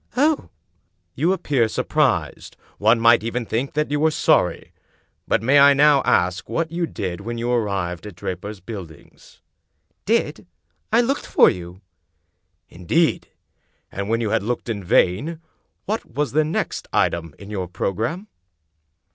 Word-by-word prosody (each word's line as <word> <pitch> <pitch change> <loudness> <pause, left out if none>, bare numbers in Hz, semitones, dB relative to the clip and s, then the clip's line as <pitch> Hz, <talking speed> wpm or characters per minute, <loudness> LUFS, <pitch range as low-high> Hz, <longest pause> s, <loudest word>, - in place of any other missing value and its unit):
"Oh!" 300 +3 +2 0.6
"You 170 - +1
appear 140 -10 +1
surprised. - - -1 0.2
One 110 +3 +4
might 115 0 +5
even 115 +1 -3
think 120 +5 -2
that 150 0 -1
you 145 - 0
were 160 +1 +4
sorry. 155 - +1 0.5
But - - +1
may 140 +4 +5
I 140 0 +7
now 145 0 +5
ask 90 0 +1
what 165 -1 -2
you 170 0 -1
did 90 - -5
when 115 +3 -5
you 120 +1 -2
arrived 100 -6 -2
at 100 - -10
Draper's 95 +3 -6
Buildings?" 90 -7 -11 0.7
"Did! - - 0 0.4
I 230 +2 +5
looked 270 +4 -2
for - - +5
you!" 90 +1 -9 0.5
" - - -50
Indeed! 155 - +1 0.6
And 100 +1 -4
when 115 +1 +1
you 110 -2 -1
had - - +2
looked 120 +3 -3
in 105 -4 -3
vain, 105 - +1 0.5
what 215 +3 -2
was 145 +4 -3
the 155 +2 +3
next 155 - -3
item 85 -3 0
in 100 +1 -11
your 95 -3 -3
programme?" 115 - -3
115 Hz, 150 wpm, -22 LUFS, 95-150 Hz, 0.7 s, I